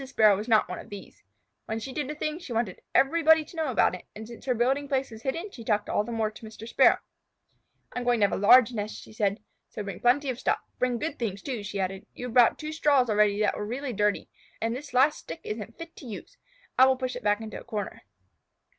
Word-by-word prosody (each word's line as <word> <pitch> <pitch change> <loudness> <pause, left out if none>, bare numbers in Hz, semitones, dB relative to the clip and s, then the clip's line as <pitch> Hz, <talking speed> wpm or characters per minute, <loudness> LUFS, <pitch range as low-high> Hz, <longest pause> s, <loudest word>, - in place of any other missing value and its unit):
Sparrow 215 -6 +5
was 210 +4 -5
not 220 -2 +4
one 180 - -5
of - - -11
these. 205 -1 -10 0.5
When 220 +1 -2
she 260 +4 -7
did 295 -1 -3
a 300 - -4
thing, 305 +1 -3
she 340 -8 -10
wanted 225 -5 -2
everybody 320 +2 +5
to - - -14
know 320 -3 -1
it, 180 -6 +1
and 215 +1 -8
since 235 0 -11
her 255 -2 +1
building 265 +5 +1
place 270 -2 -1
was 220 0 -10
hidden 330 - -3
she 235 - -10
talked 210 -2 0
all - - +1
the 235 - -7
more 220 -2 0
to 215 - -14
Mr. 220 0 -9
Sparrow. - - +5 1.0
"I - - -2
am - - -4
going 245 -1 +3
to - - +7
have - - -1
a - - +2
large 245 +3 +7
nest," 210 -1 -4
she - - -13
said. 210 -1 -1 0.3
"So 210 - -6
bring 200 -1 -6
plenty 260 +3 +3
of 250 - -7
stuff. - - +1 0.2
Bring 250 -1 +1
good 300 +4 -4
things, 200 -5 -3
too," 255 -6 -3
she 205 0 -5
added. 190 0 -3
"You 245 - -6
have 245 - -6
brought 245 -2 +6
two 310 0 -5
straws 280 -6 +3
already 210 -1 +3
that 210 - +2
were - - -4
really 250 +4 -4
dirty, 210 0 0 0.3
and 230 +1 -1
this 280 0 -8
last 280 +4 +4
stick 330 - -8
isn't 215 +1 -6
fit 330 0 -9
to 265 - -10
use. 225 - -8 0.4
I 260 - +9
will 265 -1 +3
push 255 -1 -3
it 245 - -6
back 205 0 +2
into 220 -1 -7
a - - -13
corner." 210 -4 -5
235 Hz, 250 wpm, -27 LUFS, 210-270 Hz, 1.0 s, I